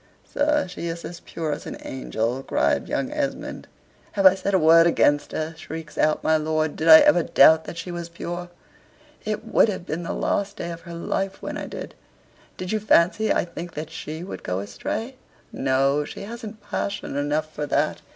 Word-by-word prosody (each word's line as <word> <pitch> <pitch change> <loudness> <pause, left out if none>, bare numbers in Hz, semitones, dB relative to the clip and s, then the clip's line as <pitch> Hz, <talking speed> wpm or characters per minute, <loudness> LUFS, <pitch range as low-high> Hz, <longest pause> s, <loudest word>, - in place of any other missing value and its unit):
"Sir, 295 -4 +2
she 175 -1 -6
is 170 0 -5
as 175 0 -7
pure 160 -2 -4
as 145 - -5
an - - -6
angel," 125 -1 -2
cried - - 0
young 270 - -1
Esmond. 295 -2 -3 0.5
"Have 195 -1 0
I 190 - +10
said 195 +1 -1
a - - +6
word 165 0 +6
against 145 -3 +2
her?" 155 +1 -3
shrieks 160 -1 -8
out 155 0 +1
my 160 0 +4
lord. 155 0 -1
"Did 160 - -2
I 160 -1 +11
ever 175 - +5
doubt 160 0 +5
that 170 - -7
she 180 - -5
was 170 -1 -5
pure? 175 +1 -6 0.7
It 215 -1 -3
would 225 0 +4
have 185 -3 -4
been 160 +1 -3
the 170 - -4
last 200 +1 -1
day 170 -4 -4
of 170 0 -8
her 170 - -6
life 195 +3 -2
when - - -4
I - - -5
did. - - -7 0.6
Do 185 - -5
you 215 +4 -1
fancy 210 +1 +3
I - - +2
think 170 0 -8
that 155 +1 -5
SHE 160 0 -6
would 185 - -7
go 90 - -2
astray? 210 - -4 0.3
No, 135 +2 +1
she - - -8
hasn't 220 0 -8
passion 200 -7 -3
enough 150 +2 -1
for 150 -1 -3
that. 150 +2 0
170 Hz, 200 wpm, -24 LUFS, 155-195 Hz, 0.7 s, I